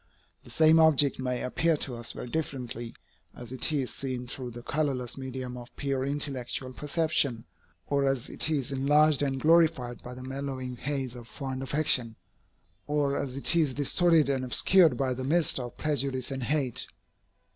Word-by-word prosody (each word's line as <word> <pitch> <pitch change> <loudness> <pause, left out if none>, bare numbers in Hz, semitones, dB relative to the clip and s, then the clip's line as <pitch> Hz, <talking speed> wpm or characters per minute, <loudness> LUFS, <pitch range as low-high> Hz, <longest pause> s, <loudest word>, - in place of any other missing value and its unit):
The - - -14
same 160 0 +5
object 150 -4 +5
may 125 -1 -2
appear 165 +5 +1
to 135 - -4
us 120 0 -4
very - - -7
differently, 125 -5 -4 0.4
as 120 -1 -10
it 130 +4 -1
is 140 -5 -1
seen 130 -2 -4
through 125 0 -6
the 120 0 -10
colorless 135 -4 -2
medium 130 -1 -6
of 120 -1 -12
pure 135 -2 -2
intellectual 135 -2 -3
perception, 150 -5 0 0.4
or 140 -1 +1
as 135 -3 -1
it - - 0
is 140 -4 0
enlarged 145 +2 +3
and 135 -2 -1
glorified 155 -6 +3
by 125 0 -9
the 130 - -9
mellowing 130 -1 -5
haze 135 -1 -3
of 120 -2 -11
fond 130 +1 -5
affection, 135 -4 +1 0.7
or 145 -1 +1
as 135 -2 -3
it 140 - +3
is 150 -6 +2
distorted 160 +2 +3
and 135 -2 0
obscured 155 +3 +4
by 130 -1 0
the 130 +1 -5
mists 155 +2 +2
of 120 -1 -7
prejudice 135 -3 -2
and 135 -1 -4
hate. 140 -3 -1
135 Hz, 165 wpm, -28 LUFS, 125-150 Hz, 0.7 s, same